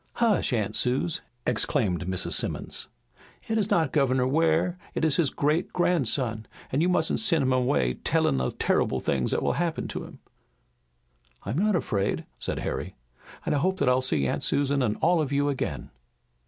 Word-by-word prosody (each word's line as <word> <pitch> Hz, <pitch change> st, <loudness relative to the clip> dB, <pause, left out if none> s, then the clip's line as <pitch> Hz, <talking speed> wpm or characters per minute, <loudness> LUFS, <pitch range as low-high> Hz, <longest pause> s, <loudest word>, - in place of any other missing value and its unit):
"Hush, 225 Hz, -10 st, +2 dB
Aunt 110 Hz, -3 st, -1 dB
Suse," 130 Hz, +9 st, 0 dB, 0.2 s
exclaimed 110 Hz, -, 0 dB
Mrs. 95 Hz, -1 st, -1 dB
Simmons. -, -, -2 dB, 0.6 s
"It 225 Hz, 0 st, +1 dB
is 210 Hz, 0 st, 0 dB
not 160 Hz, -5 st, +2 dB
Governor 130 Hz, -3 st, +2 dB
Ware, 165 Hz, +5 st, +1 dB, 0.2 s
it -, -, +1 dB
is 150 Hz, -3 st, +2 dB
his 160 Hz, -5 st, +3 dB
great 150 Hz, +5 st, 0 dB
grandson, 130 Hz, -10 st, 0 dB, 0.2 s
and 140 Hz, -, +1 dB
you 175 Hz, -, +3 dB
mustn't 160 Hz, -3 st, +2 dB
send 170 Hz, -9 st, +3 dB
him 130 Hz, 0 st, +2 dB
away 125 Hz, -, +1 dB
tellin' 65 Hz, +1 st, +1 dB
of 65 Hz, -, -3 dB
terrible -, -, +1 dB
things 65 Hz, -2 st, 0 dB
that -, -, 0 dB
will -, -, +1 dB
happen 165 Hz, -3 st, -2 dB
to -, -, -5 dB
him." -, -, -12 dB, 1.3 s
"I'm 115 Hz, -, -2 dB
not 210 Hz, 0 st, +2 dB
afraid," 100 Hz, -, -1 dB
said -, -, -3 dB
Harry, -, -, -4 dB, 0.5 s
"and -, -, 0 dB
I 145 Hz, -, +2 dB
hope 190 Hz, +5 st, +1 dB
that -, -, 0 dB
I'll 125 Hz, +1 st, +3 dB
see 130 Hz, -, 0 dB
Aunt -, -, -1 dB
Susan 140 Hz, 0 st, +1 dB
and 110 Hz, -4 st, 0 dB
all 170 Hz, 0 st, +3 dB
of 145 Hz, -3 st, -2 dB
you 145 Hz, 0 st, +1 dB
again." 140 Hz, -, -3 dB
140 Hz, 180 wpm, -26 LUFS, 125-165 Hz, 1.3 s, his